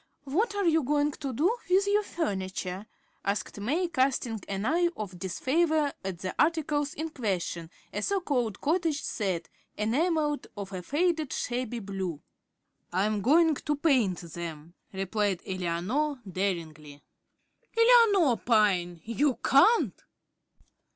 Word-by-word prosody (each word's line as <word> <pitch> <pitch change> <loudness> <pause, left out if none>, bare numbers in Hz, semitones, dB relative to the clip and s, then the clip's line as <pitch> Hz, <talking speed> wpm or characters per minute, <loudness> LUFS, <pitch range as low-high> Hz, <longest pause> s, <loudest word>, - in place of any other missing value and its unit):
"What 410 - 0
are 405 -1 0
you 325 -1 +4
going 290 +2 +1
to 275 -1 -5
do 330 - +2
with 380 +2 +4
your 410 +1 +3
furniture?" 190 - -3 0.4
asked 200 +1 -2
May, 300 - 0
casting 260 -6 0
an 195 +1 -2
eye 345 +6 +3
of 190 -4 -6
disfavor 295 - +1
at 190 -2 -4
the 185 +2 -4
articles 300 -3 +1
in 320 +2 -3
question, 180 - -3 0.2
a 205 - -2
so 395 - +1
called 245 - -1
"cottage" 320 -1 0
set, 190 -6 -2 0.3
enamelled, 295 +7 0
of 200 -1 -6
a 185 - -4
faded, 310 - 0
shabby 245 -1 -2
blue. 190 -7 -4 0.7
"I 185 +3 +1
am 215 -1 0
going 320 - +5
to 295 +2 -2
paint 260 - +2
them," 170 -1 -7 0.2
replied 195 0 -1
Eleanor, 190 - -1
daringly. 160 -6 -4 0.7
"Eleanor 450 - +6
Pyne! 185 -7 +2
you 260 +4 +1
can't!" 425 +13 +4
245 Hz, 130 wpm, -28 LUFS, 190-315 Hz, 0.7 s, Eleanor